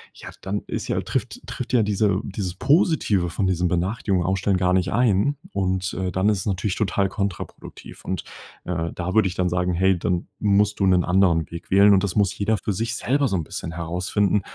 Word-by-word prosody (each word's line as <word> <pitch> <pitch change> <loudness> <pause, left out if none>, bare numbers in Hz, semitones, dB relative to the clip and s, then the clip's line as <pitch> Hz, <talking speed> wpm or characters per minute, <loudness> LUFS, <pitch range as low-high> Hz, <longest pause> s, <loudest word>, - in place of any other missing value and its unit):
Ja, - - -10
dann 100 +2 -3
ist - - -4
ja - - 0
trifft - - -4
tritt - - -6
ja 115 -3 +4
diese 100 -1 +1
dieses 95 -3 -4
Positive 135 - +2
von 95 +3 -1
diesem 90 -1 +1
Benachrichtigungen 90 +1 0
ausstellen 95 +1 +1
gar 90 0 +2
nicht 95 0 +1
ein 120 +4 +2 0.2
und, 95 -1 -1
äh, 90 0 -2
dann 95 +3 0
ist 105 -2 +2
es - - -5
natürlich 95 0 -1
total 100 -1 0
kontraproduktiv. 100 -1 -6
Und, 95 - -3 0.4
äh, 85 -2 -3
da 90 +1 -3
würde 110 -1 +4
ich 90 - -5
dann 90 -1 0
sagen: 90 0 0
„Hey, 95 0 +2
dann 90 0 -1
musst 105 0 +2
du 95 - +3
'nen 90 -1 +4
anderen 90 -3 +2
Weg 85 0 -8
wählen." 100 +1 +6
Und 95 - +3
das 95 -3 -2
muss 100 -1 +2
jeder 105 +2 0
für 100 +2 -2
sich 115 +4 -2
selber 140 +2 +1
so 100 - -1
'n 85 - -1
bisschen 80 - -6
herausfinden, 90 +4 0
95 Hz, 210 wpm, -23 LUFS, 90-105 Hz, 0.4 s, wählen